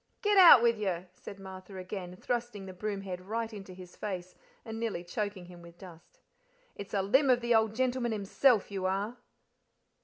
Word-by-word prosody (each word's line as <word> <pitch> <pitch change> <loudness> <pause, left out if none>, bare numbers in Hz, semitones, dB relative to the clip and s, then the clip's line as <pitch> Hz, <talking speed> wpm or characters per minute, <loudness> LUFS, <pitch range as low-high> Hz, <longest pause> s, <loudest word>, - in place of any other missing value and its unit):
"Get 415 0 +3
out 335 -10 +10
with 235 -2 +3
you!" 185 -4 -2
said 195 +1 -11
Martha 190 0 -10
again, 185 -1 -6
thrusting 235 -1 -4
the 190 - -8
broom 200 +1 -4
head 185 -2 -6
right 225 +4 -4
into 195 -2 -9
his 180 -1 -12
face, 185 -3 -5 0.3
and 225 -1 -6
nearly 220 -7 -3
choking 200 +1 -4
him 175 -1 -13
with 170 0 -14
dust. 170 -3 -15 0.5
"It's 200 0 -7
a 195 - +1
limb 265 +8 +3
of 250 -1 +5
the 235 0 +1
old 220 -1 +2
gentleman 250 -1 0
himself 215 +2 +2
you 190 -2 -2
are." 200 +6 -2
200 Hz, 185 wpm, -30 LUFS, 185-230 Hz, 0.5 s, out